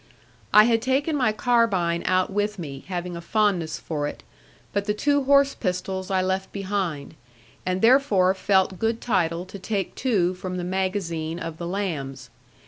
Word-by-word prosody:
I 210 - +8
had 230 0 +2
taken 270 +5 +1
my 250 -6 +2
carbine 210 -7 +1
out 185 +1 +2
with 205 +1 -1
me, 140 -6 -7
having 180 -1 -4
a 170 - -6
fondness 185 -5 0
for 150 -3 -3
it; - - -8 0.5
but 200 0 0
the 210 0 0
two 285 +4 +1
horse 280 0 +5
pistols 190 -1 -3
I 190 -1 +1
left 190 +1 -2
behind; 190 -8 -3 0.5
and 185 +2 -1
therefore 225 -7 +5
felt 190 -1 +1
good 225 0 0
title 175 -6 0
to 195 +1 -10
take 195 0 -2
two 195 -9 +1
from 185 0 -5
the 180 - -3
magazine 180 -3 -2
of 165 -2 -6
the 170 - -4
lambs. 170 -8 -4
190 Hz, 165 wpm, -24 LUFS, 175-215 Hz, 0.5 s, I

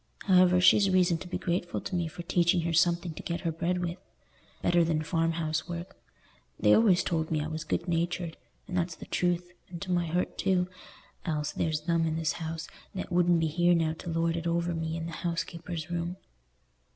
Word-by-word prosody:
However, 180 -2 +5
she's 195 +2 +6
reason 180 -3 +3
to 185 - -8
be 180 - -3
grateful 175 0 -2
to - - -6
me 170 -2 0
for 170 +2 -8
teaching 175 +1 +2
her 165 0 -1
something 170 0 +2
to - - -8
get 170 0 -3
her 165 - -1
bread 170 +3 -1
with, 175 0 -3 0.6
better 175 -1 +4
than 160 -2 0
farm 165 +1 +1
house 160 0 -2
work. 175 +3 -6 0.6
They - - +5
always 200 -6 +5
told 160 -2 -1
me 155 - +1
I 150 - -2
was 155 0 -4
good 165 +3 -2
natured—and 170 -3 -3
that's 170 -2 0
the - - -10
truth, 175 0 0 0.2
and 170 -1 -7
to 185 - -4
my 175 -1 +1
hurt 175 +3 -1
too, 185 -2 +2 0.6
else 150 -3 -1
there's 155 -2 -1
them 165 +1 +1
in 160 - -1
this 160 -1 0
house 165 0 -4 0.3
that 185 - -5
wouldn't 175 -1 +4
be 165 - +1
here 175 +3 +3
now 160 -1 +1
to - - -6
lord 165 0 +1
it 170 0 -3
over 170 +1 0
me 165 0 -2
in 165 - -4
the 170 - -5
housekeeper's 170 -1 -4
room." 175 +1 -2
170 Hz, 205 wpm, -29 LUFS, 165-175 Hz, 0.6 s, she's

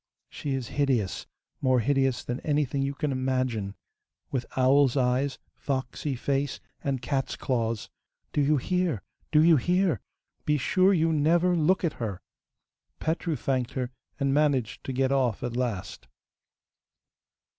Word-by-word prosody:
She 140 -2 -3
is 130 -4 -4
hideous, 130 -10 0 0.3
more 130 -2 +3
hideous 135 +1 +1
than 125 +2 -3
anything 145 -2 0
you 140 +1 -1
can 150 0 -1
imagine, 130 -6 -1 0.6
with 125 -3 -2
owl's 135 +1 +4
eyes, 130 +2 +1 0.2
foxy 135 +1 -3
face, 140 +2 -1 0.2
and 135 -3 -1
cat's 135 0 -1
claws. 115 -4 -2 0.4
Do 145 - +2
you 145 +1 +3
hear? 175 - 0 0.3
do 150 0 +6
you 165 -1 +6
hear? 175 - +1 0.4
Be 150 0 +2
sure 185 +7 +3
you 165 -3 +3
never 170 +4 +3
look 170 +3 +2
at 165 -3 +1
her.' 100 -5 -3 0.8
Petru 160 0 -1
thanked 130 -1 -1
her, 125 -1 -2 0.3
and 135 -1 +1
managed 140 -6 +1
to - - -3
get 130 +1 +1
off 130 -6 +1
at 120 -1 -3
last. 115 -7 -3
135 Hz, 140 wpm, -27 LUFS, 125-150 Hz, 0.8 s, do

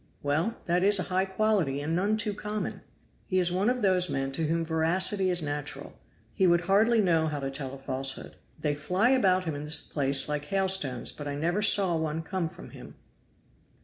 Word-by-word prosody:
"Well, 160 +11 0
that 175 0 +1
is 200 +2 +4
a 185 - -1
high 190 +1 +2
quality 190 -8 0
and 155 +3 -2
none 205 +5 +1
too 215 -1 -1
common." 210 +1 -5 0.5
"He 185 - -1
is 180 -1 +2
one 190 +5 +1
of 250 -2 -1
those 180 -2 +3
men 135 0 -2
to 160 +3 -2
whom 165 +1 -1
veracity 180 +4 +2
is 175 -2 +3
natural. 145 0 -5 0.4
He 190 -3 +2
would 170 0 +3
hardly 210 +6 +3
know 165 -4 +2
how 150 -2 -3
to 135 0 -4
tell 135 -1 -6
a - - -10
falsehood. 135 0 -1 0.2
They 150 -1 -1
fly 180 - +1
about 190 -8 +3
him 160 -3 -3
in 145 0 -6
this 150 +1 +1
place 135 -2 -1
like 150 -1 -3
hailstones, 185 -9 +1
but 145 - -8
I 140 - -3
never 170 +7 -1
saw 195 -4 +4
one 160 0 -2
come 180 0 -3
from - - -9
him." - - -12
170 Hz, 205 wpm, -28 LUFS, 145-195 Hz, 0.5 s, is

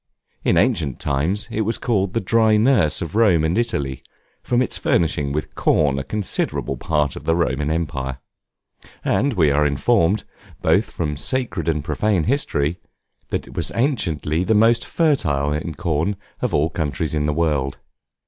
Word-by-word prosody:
In - - +2
ancient 70 -6 +1
times 75 +9 -1
it 110 - -1
was 110 +2 0
called 100 -6 0
the - - +3
dry 110 +1 +3
nurse 105 - +3
of 85 - -7
Rome 100 -8 +4
and 80 +2 +1
Italy, 70 - -1 0.4
from 120 - 0
its 125 - 0
furnishing 75 -4 +1
with 75 +2 -3
corn 70 -3 +2
a - - -3
considerable 100 +8 -2
part 75 -3 0
of - - -9
the 80 - +2
Roman 75 -3 0
Empire; 70 -5 -2 0.9
and 140 +3 +1
we 80 -8 +3
are 75 +2 +3
informed, 85 - +2 0.4
both - - +2
from 75 -3 -3
sacred 130 - -2
and 75 -3 -1
profane 85 +4 0
history, 90 - 0 0.5
that - - -2
it - - -13
was - - -2
anciently 90 - 0
the 110 +4 +2
most 115 +2 +4
fertile 75 - +1
in 80 +1 -4
corn 85 +4 -1 0.3
of - - 0
all 75 +3 +1
countries 80 -2 -2
of 75 -1 0
the - - +2
world. 75 -4 0
80 Hz, 165 wpm, -21 LUFS, 75-110 Hz, 0.9 s, Rome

